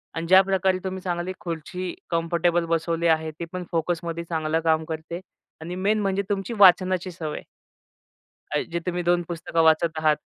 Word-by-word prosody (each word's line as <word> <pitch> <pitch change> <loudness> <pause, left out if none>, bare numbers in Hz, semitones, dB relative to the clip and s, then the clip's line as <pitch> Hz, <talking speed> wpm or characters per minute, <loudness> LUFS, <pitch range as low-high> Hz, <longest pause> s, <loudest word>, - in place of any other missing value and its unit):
आणि 165 - -3
ज्या 190 +2 +8
प्रकारे 190 -1 +1
तुम्ही 190 0 -4
चांगली 180 0 -3
खुर्ची 180 0 -5 0.2
कम्फर्टेबल 170 0 +1
बसवली 165 0 0
आहे 160 -1 +2
ती 170 - -3
पण 180 0 -3
फोकसमध्ये 170 0 -2
चांगलं 160 -1 0
काम 160 -1 +2
करते 160 +2 -5 0.4
आणि 175 +2 -5
मेन 205 +3 +1
म्हणजे 195 -1 0
तुमची 200 +3 -2
वाचनाची 185 -1 +5
सवय. 160 -3 -5 1.3
जे 170 - -1
तुम्ही 175 +1 -3
2 175 0 +3
पुस्तकं 165 -1 -1
वाचत 160 0 +3
आहात 155 -1 +3
170 Hz, 155 wpm, -24 LUFS, 165-185 Hz, 1.3 s, ज्या